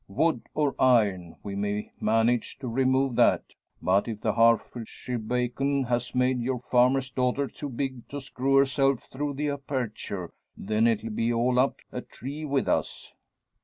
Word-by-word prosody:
Wood 120 +6 0
or 150 -3 +1
iron, 100 -9 +3
we 100 -1 -5
may 105 +1 -2
manage 115 +3 +1
to 135 -1 -6
remove 130 +1 +1
that; - - +3 0.3
but 95 +4 +2
if 110 -3 -4
the - - 0
Herefordshire 115 +1 +1
bacon 125 +4 0
has 120 0 -2
made 125 0 +2
your 125 +2 -1
farmer's 125 +2 +2
daughter 130 +2 0
too 145 +1 -7
big 130 -1 -4
to 145 - -5
screw 135 0 -1
herself 135 -1 +3
through 145 +1 -4
the 150 +1 -1
aperture, 120 -9 -4 0.2
then 110 +3 +1
it'll 115 -1 0
be 115 +2 0
all 125 +2 +2
up 135 +2 +1
a 125 - -4
tree 140 +6 -7
with 140 -2 0
us. - - -1
125 Hz, 160 wpm, -27 LUFS, 115-135 Hz, 0.3 s, iron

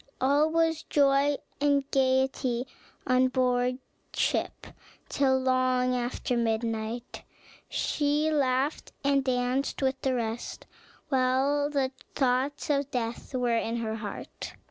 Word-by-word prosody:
All 285 +4 +3
was 325 0 +1
joy 280 0 +3 0.2
and 285 -1 +3
gayety 260 -2 +1 0.4
on 255 0 +4
board 250 -1 +1 0.4
ship - - -1 0.4
till 265 -2 +2
long 255 -1 +2
after 245 0 -2
midnight; 225 0 -2 0.5
she 295 +1 +1
laughed 275 0 0
and 280 -1 +3
danced 255 +2 0
with 265 0 0
the 265 -1 +1
rest, 230 -1 -4 0.4
while 270 +2 +2
the 275 -3 0 0.2
thoughts 270 +3 +1
of 280 -1 0
death 240 0 -4
were 245 -2 +1
in 230 0 -1
her 225 -1 -2
heart. 210 -2 -7
260 Hz, 115 wpm, -28 LUFS, 245-280 Hz, 0.5 s, on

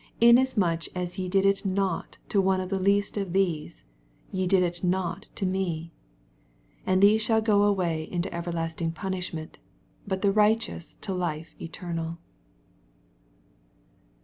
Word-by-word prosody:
Inasmuch 235 -9 +4
as 180 +1 -4
ye 185 -1 -2
dia 195 +1 +3
it 195 +1 +2
not 195 -2 -1
to 200 - +3
one 190 0 +2
of 185 -1 -4
the 195 -1 -1
leaat 200 +2 +2
of 195 -4 -2
these, 165 - -1 0.5
ye 185 -1 -1
did 185 0 +4 0.2
ii 180 - +1
not 185 -1 -2
to 195 - -2
me. 175 -3 -2 0.9
46 - - -23
And 185 +1 +3
these 215 +2 +6
shall 220 0 +3
go 215 -2 +3
away 180 -6 +1
into 175 +1 -2
everlasting 165 -1 -3
punishment: 180 -3 -5 0.5
buttherigh* 205 +3 +4
teous 220 -7 -8
into 195 - -4
life 165 -3 -3
eternal. 165 -1 -5
185 Hz, 140 wpm, -27 LUFS, 170-200 Hz, 0.9 s, these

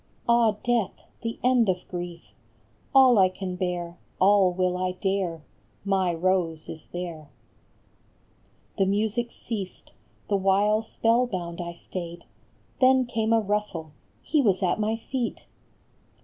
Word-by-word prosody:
Ah, 235 -2 +4
death, 240 -5 +1 0.3
the 230 -1 -4
end 245 -4 +4
of 180 -1 -1
grief! 175 -1 -7 0.6
All 260 -5 +7
I 185 -1 +6
can 185 -1 -5
bear, 180 -1 -3 0.2
all 195 -1 +5
will 180 0 0
I 185 0 -1
dare! 185 -4 -2 0.4
My 190 -2 +2
Rose 170 -2 0
is 160 -1 -9
there! 170 -4 -6 0.7
" - - -37
The 195 - +3
music 220 +4 0
ceased, 205 -6 -7 0.4
the 200 - +2
while 200 +3 +3
spell 230 +2 +1
bound 175 -4 -4
I 170 0 -5
stayed; 170 0 -7 0.6
Then 260 0 +5
came 225 -2 -1
a 230 - +5
rustle, 205 -6 -2 0.3
he 305 - +2
was 195 -6 +2
at 180 +3 +1
my 215 +1 +1
feet 240 +1 -4
190 Hz, 135 wpm, -26 LUFS, 180-225 Hz, 0.7 s, All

